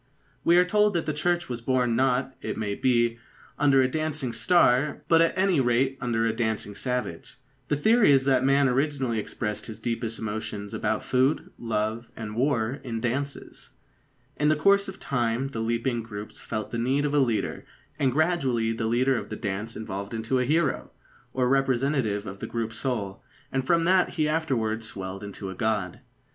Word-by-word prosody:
We 170 +1 +5
are 180 - +6
told 210 +1 +2
that 165 - 0
the 155 - -1
Church 175 +3 0
was 120 -2 -4
born 125 -1 +1
not, 130 +1 +1
it - - -4
may 105 -2 -2
be, 120 0 +1 0.4
under 135 -2 +5
a - - +3
dancing 155 -3 -2
star, 135 +1 +3
but 165 -1 +5
at 165 +2 +2
any 190 -4 +3
rate 130 +2 +1
under 115 -3 0
a 115 - +1
dancing 110 -3 -2
savage. 125 -7 -4 0.3
The 145 - +1
theory 220 +4 +4
is 135 -1 +4
that 130 -2 +3
man 140 +1 +4
originally 135 -3 0
expressed 105 0 -4
his 110 - -8
deepest 115 -1 -3
emotions 105 -1 -5
about 110 0 -1
food, 130 +3 +1
love, 110 0 -2
and 110 -1 -6
war 125 0 0
in 115 -3 -4
dances. 140 +5 -4 0.6
In 150 +1 +2
the 155 - +4
course 200 +6 +3
of 190 - -8
time 120 0 -1
the 115 - -5
leaping 115 +1 -1
groups 105 -2 -8
felt 110 -2 -4
the 115 - -2
need 135 +5 +1
of 145 - -1
a 145 - +4
leader, 120 -5 0 0.4
and 135 -3 +2
gradually 135 -7 +1
the 110 0 -2
leader 125 +3 +2
of 105 - -9
the - - -4
dance 105 +2 -4
evolved 100 0 -5
into 115 +4 0
a 125 - +1
hero, 150 +1 +1 0.4
or 125 -1 +1
representative 130 -5 +1
of 95 0 -7
the - - -5
group 115 -1 -3
soul, 110 -6 -3 0.3
and 130 0 -1
from 170 -1 +3
that 185 +1 +3
he 155 -3 +1
afterwards 115 -8 -1
swelled 95 0 -6
into 100 -1 -6
a - - -5
god. 105 -3 -1
125 Hz, 185 wpm, -26 LUFS, 110-140 Hz, 0.6 s, are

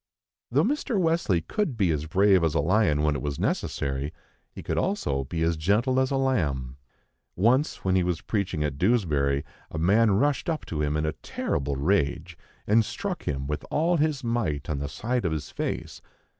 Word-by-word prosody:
Though 140 +6 +3
Mr. 260 -3 0
Wesley 165 - +2
could 155 - -2
be 95 -5 +2
as 75 0 -2
brave 95 +1 +4
as 80 -2 +1
a - - +3
lion 80 -2 +2
when 75 -1 +2
it 70 - -3
was 70 +1 -3
necessary, 70 +2 -2 0.4
he - - -10
could - - -1
also 70 - -1
be 80 +4 -2
as 85 0 +2
gentle 110 - +2
as 130 0 +2
a 140 - 0
lamb. 70 - 0 0.6
Once, 120 - +2
when 95 0 +2
he 95 - +4
was 90 -2 -1
preaching 95 -7 -1
at 70 -2 -3
Dewsbury, 75 - +2 0.2
a - - -6
man 105 +8 +4
rushed 140 - +1
up 160 -2 -2
to 75 -2 -3
him 75 0 0
in 75 - 0
a 75 - -1
terrible 70 0 -3
rage, 70 +1 0 0.3
and 110 +2 +4
struck 190 - -4
him 70 -1 -2
with 75 +1 -3
all 170 +3 +2
his 150 -3 0
might 95 - -1
on 70 - -2
the 70 0 -3
side 125 +2 -2
of 85 - 0
his 80 -2 -4
face. - - -4
90 Hz, 195 wpm, -26 LUFS, 75-125 Hz, 0.6 s, brave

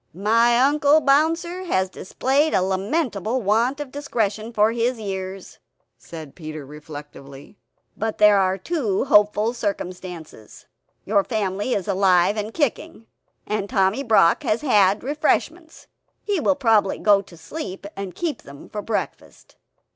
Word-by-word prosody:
"My 230 +5 +3
Uncle 290 +3 +4
Bouncer 330 +6 +1
has 190 - 0
displayed 270 +11 0
a 185 - +2
lamentable 210 - -1
want 235 +6 +1
of 290 -3 -6
discretion 225 -6 -2
for 215 -1 +3
his 235 +1 -1
years;" 190 -2 -6 0.4
said 155 -4 -11
Peter 155 -3 -8
reflectively, 145 +1 -12 0.4
"but 220 0 -3
there 210 -1 +6
are 190 0 +1
two 230 - -1
hopeful 210 -2 +3
circumstances. 180 - -6 0.4
Your 200 -1 +2
family 205 +1 -2
is 195 - -3
alive 190 -1 +3
and 215 0 -4
kicking; 295 -1 -2 0.4
and 210 -1 -3
Tommy 195 +5 +1
Brock 220 -10 +4
has 215 - -1
had 205 -7 +3
refreshments. 315 +3 -2 0.4
He 405 -4 -1
will 290 - +2
probably 225 -7 +2
go 205 -2 +4
to 185 -3 -16
sleep, 195 - -7
and 195 -2 -6
keep 335 -4 -3
them 140 0 -13
for 210 - -5
breakfast." 220 0 -5
210 Hz, 135 wpm, -22 LUFS, 190-265 Hz, 0.4 s, there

